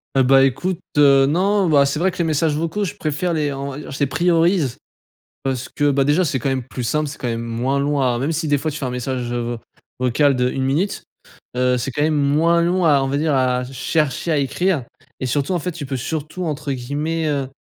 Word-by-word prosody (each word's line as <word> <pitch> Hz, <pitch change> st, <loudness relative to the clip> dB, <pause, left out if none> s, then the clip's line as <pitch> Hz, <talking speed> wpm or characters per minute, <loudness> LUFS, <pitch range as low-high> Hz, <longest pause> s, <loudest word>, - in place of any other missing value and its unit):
Heu, 135 Hz, -, +5 dB
bah, 135 Hz, +1 st, +5 dB
écoute, 175 Hz, +7 st, -1 dB, 0.2 s
heu, 140 Hz, -2 st, +6 dB
non. 190 Hz, +6 st, +2 dB
Bah, 140 Hz, -2 st, +5 dB
c'est 140 Hz, -, -2 dB
vrai 190 Hz, +1 st, +2 dB
que -, -, -12 dB
les 170 Hz, -, +3 dB
messages 155 Hz, -1 st, +1 dB
vocaux 165 Hz, +7 st, -2 dB
je 190 Hz, -, -3 dB
préfère 155 Hz, +3 st, -2 dB
les 150 Hz, -3 st, 0 dB
en 140 Hz, 0 st, -5 dB, 0.2 s
je 135 Hz, -, -7 dB
les 140 Hz, -, +3 dB
priorise 170 Hz, -3 st, +2 dB, 0.7 s
parce 130 Hz, -1 st, -2 dB
que, 145 Hz, 0 st, +1 dB
bah, 140 Hz, 0 st, +2 dB
déjà 150 Hz, +6 st, +2 dB
c'est 135 Hz, -4 st, -1 dB
quand 135 Hz, -, -1 dB
même 130 Hz, -1 st, -1 dB
plus 130 Hz, -1 st, -5 dB
simple, 150 Hz, +6 st, 0 dB
c'est 145 Hz, -, -7 dB
quand 125 Hz, -, -3 dB
même 115 Hz, -1 st, -2 dB
moins 120 Hz, +4 st, -1 dB
long 145 Hz, 0 st, 0 dB
à 125 Hz, -2 st, +1 dB
même 140 Hz, +6 st, -1 dB
si 160 Hz, 0 st, -2 dB
des 145 Hz, -, +3 dB
fois 155 Hz, +3 st, -2 dB
tu 150 Hz, -, -6 dB
fais 140 Hz, -, -4 dB
un -, -, -2 dB
message, 125 Hz, -1 st, -3 dB
heu, 120 Hz, -, -1 dB
vo 120 Hz, 0 st, -3 dB, 0.4 s
vocal 135 Hz, +2 st, +2 dB
de 125 Hz, 0 st, +1 dB
1 135 Hz, -, -2 dB
minute. 155 Hz, +10 st, 0 dB, 0.5 s
Heu, 125 Hz, 0 st, +2 dB
c'est 130 Hz, +3 st, -3 dB
quand 145 Hz, -, -2 dB
même 155 Hz, 0 st, +2 dB
moins 155 Hz, +4 st, +3 dB
long 175 Hz, +1 st, +1 dB
à, 145 Hz, -3 st, +4 dB
on -, -, -1 dB
va 140 Hz, +1 st, -1 dB
dire, 150 Hz, -1 st, +1 dB
à 125 Hz, -1 st, +1 dB
chercher 145 Hz, +4 st, -1 dB
à 155 Hz, -, +2 dB
écrire 160 Hz, +2 st, 0 dB, 0.4 s
et -, -, -2 dB
surtout, 145 Hz, +7 st, 0 dB
en 175 Hz, -, 0 dB
fait, 180 Hz, +4 st, -3 dB
tu 160 Hz, -4 st, -7 dB
peux 135 Hz, -1 st, -3 dB
surtout 155 Hz, +6 st, -4 dB
entre 150 Hz, -2 st, -3 dB
guillemets, 150 Hz, +6 st, -2 dB
heu: 140 Hz, -3 st, -1 dB
145 Hz, 245 wpm, -20 LUFS, 130-160 Hz, 0.7 s, heu